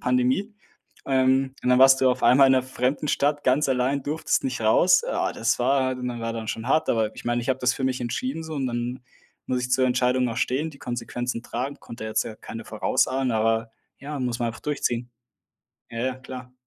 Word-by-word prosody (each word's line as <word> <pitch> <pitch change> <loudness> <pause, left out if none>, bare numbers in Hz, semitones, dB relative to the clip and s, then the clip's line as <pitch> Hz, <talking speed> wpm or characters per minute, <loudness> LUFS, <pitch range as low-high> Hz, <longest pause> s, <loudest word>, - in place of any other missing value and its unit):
Pandemie. 130 - +1 0.5
Ähm, 130 0 +2
und - - -1
dann 125 - +5
warst 135 0 +7
du 130 -1 +5
auf 125 - -2
einmal 135 +2 +7
in - - +5
'ner 130 - +3
fremden 130 +3 -2
Stadt 145 +1 +1
ganz 135 +3 +3
allein 130 +2 +1
durftest 155 - -1
nicht 265 - -2
raus. - - +5
Oh, - - 0
das 115 +3 0
war 130 +1 +2
und 125 0 -4
war 115 0 -3
dann 115 -1 -5
schon 115 +2 -4
hart, 155 +3 +2
aber 110 -2 +1
ich - - -11
meine, 120 0 0
ich 125 - -7
habe 130 0 +1
das 125 0 +2
für 130 - -3
mich 130 -1 -1
entschieden, 130 +6 -3
so 160 -1 -6
und 135 -2 -1
dann 120 +1 -3 0.5
muss 125 -1 -1
ich 125 - -3
zur 130 0 +3
Entscheidung 125 0 +2
auch 115 - -5
stehen, 135 +6 0
die 140 - -16
Konsequenzen 120 0 -4
tragen, 130 +4 -4
konnte 115 -1 -10
jetzt 110 - 0
ja 110 - -7
keine 115 0 -8
vorausahnen, 130 +4 0
aber 110 +1 +1 0.3
ja, 145 +1 -6
muss 125 -2 -2
man 120 - +1
einfach 110 - -7
durchziehen. 125 -5 -2 0.8
Ja, 115 - -6
ja, 130 - -3
klar. 125 0 -10
125 Hz, 215 wpm, -25 LUFS, 120-135 Hz, 0.8 s, warst